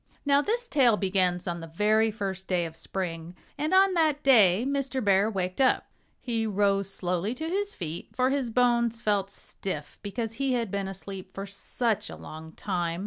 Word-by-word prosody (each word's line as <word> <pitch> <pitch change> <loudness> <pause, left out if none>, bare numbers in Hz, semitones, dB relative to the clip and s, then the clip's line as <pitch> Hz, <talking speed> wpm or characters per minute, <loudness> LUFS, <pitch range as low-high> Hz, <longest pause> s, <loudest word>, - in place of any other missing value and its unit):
Now, 280 0 +4
this 475 +8 -1
tale 250 - +4
begins 185 -2 +1
on 170 0 -2
the 165 - -8
very 215 +6 +2
first 195 -3 -4
day 180 -2 +1
of 160 -1 -7
spring. 170 -2 -5 0.2
And 300 +2 -2
on 380 0 +5
that 310 -4 +2
day 220 -5 +6
Mr. 275 -1 -1
Bear 200 +1 +4
waked 185 +1 -2
up. 260 - +2 0.3
He 230 -3 -1
rose 200 -1 +1
slowly 180 +5 -2
to 315 +4 -4
his 400 +4 -1
feet, 165 -2 -5
for 255 +1 +1
his 270 -3 0
bones 235 -1 +2
felt 205 -3 0
stiff 155 -6 -6
because 225 +2 -4
he 270 -1 +2
had 230 -5 -1
been 200 -1 -2
asleep 195 0 -7
for 195 - -4
such 210 +2 -2
a - - -7
long 160 +1 -10
time. 175 -4 -2
205 Hz, 185 wpm, -27 LUFS, 185-255 Hz, 0.3 s, day